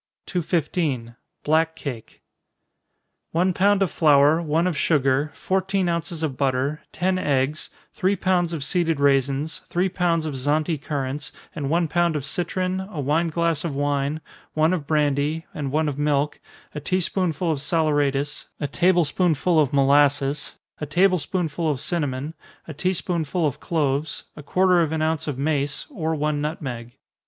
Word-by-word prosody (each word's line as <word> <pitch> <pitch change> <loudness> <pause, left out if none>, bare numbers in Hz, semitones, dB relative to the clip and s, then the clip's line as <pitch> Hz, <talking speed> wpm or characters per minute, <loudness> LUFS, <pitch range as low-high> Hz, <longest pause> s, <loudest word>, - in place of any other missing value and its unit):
215. 155 -8 -1 0.3
Black 160 +1 +2
Cake. 125 -8 -8 1.1
One 180 +3 +2
pound 200 +2 +3
of 190 - -1
flour, 150 +1 +4
one 165 +1 +1
of 180 -3 0
sugar, 140 -1 +2
fourteen 190 0 0
ounces 170 -1 -2
of 140 -5 -2
butter, 135 +2 0
ten 185 +2 0
eggs, 145 -1 0 0.2
three 195 0 +1
pounds 180 -3 +1
of 160 -5 -3
seeded 165 -2 0
raisins, 140 +2 +1
three 180 +2 +1
pounds 170 -3 0
of 155 - -3
Zante 150 +4 0
currants, 145 -1 -3 0.2
and 145 -4 -3
one 170 +1 +2
pound 175 0 +1
of 145 -3 -2
citron, 185 +4 -1
a 190 -4 -6
wine 150 +5 +1
glass 165 -1 0
of 160 -5 -3
wine, 145 +1 -1 0.3
one 155 +3 +3
of 155 -6 -3
brandy, 150 +1 +1
and 140 -3 -4
one 155 +2 +1
of 145 -1 -3
milk, 145 0 +1 0.3
a 150 - -4
tea 185 +6 0
spoonful 175 -2 0
of 150 - -1
saleratus, 145 -2 0
a 145 - -2
table 175 +3 +3
spoonful 165 +1 +2
of 145 -4 +2
molasses, 140 +1 +2 0.3
a 150 - -4
table 185 +3 +3
spoonful 165 -1 -2
of 140 -4 -1
cinnamon, 145 -2 -2 0.3
a 160 - -6
tea 180 +6 0
spoonful 170 -1 -1
of 145 - -1
cloves, 150 -2 -1
a 150 - -9
quarter 180 +4 +3
of 160 -2 0
an 155 -1 0
ounce 160 -1 -1
of 145 -4 -3
mace, 145 0 -1
or 160 - -2
one 150 -1 -1
nutmeg. 125 -6 -5
155 Hz, 160 wpm, -23 LUFS, 145-170 Hz, 1.1 s, flour